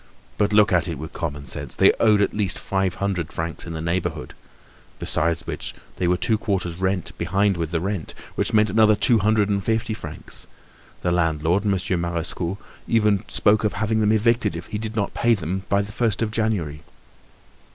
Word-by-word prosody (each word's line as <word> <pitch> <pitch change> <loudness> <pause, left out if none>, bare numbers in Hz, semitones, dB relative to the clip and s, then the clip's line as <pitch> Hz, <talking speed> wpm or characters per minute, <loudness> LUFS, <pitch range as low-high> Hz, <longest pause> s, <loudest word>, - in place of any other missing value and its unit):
But 105 0 +2
look 105 -2 +5
at 90 - +3
it - - -3
with 80 +3 -8
common 70 -3 -4
sense. 65 - -5
They - - +6
owed 105 -2 +5
at - - -1
least 100 -3 -1
five 95 -2 -1
hundred 95 -5 -2
francs 80 +1 -4
in 85 - -5
the 80 0 -4
neighborhood. 85 -6 -2 0.6
Besides 85 +2 0
which, - - -5 0.2
they 90 - 0
were 90 +1 +3
two 110 0 +1
quarters' 95 -6 -2
rent 95 -1 -1
behind 95 +4 +2
with 85 -2 -2
the 85 0 -1
rent, 95 -1 -3 0.2
which - - 0
meant 105 -2 +3
another 110 0 +5
two 115 +2 +4
hundred 105 0 +3
and 100 -1 0
fifty 110 +2 0
francs; 80 -8 -5 0.6
the 90 - +1
landlord, 85 +3 +1
Monsieur 95 -2 0
Marescot, 85 +1 -3 0.3
even 105 -3 +2
spoke 105 +1 +2
of 105 - +1
having 110 +2 0
them 105 0 +3
evicted 115 -3 +2
if 85 0 -8
they 105 - -2
did 110 0 -5
not 100 -3 -1
pay 120 0 +3
him 95 +1 -4
by 100 0 +3
the 100 - -8
first 115 -1 0
of 110 - -2
January. 100 -10 -1
95 Hz, 195 wpm, -23 LUFS, 85-105 Hz, 0.6 s, They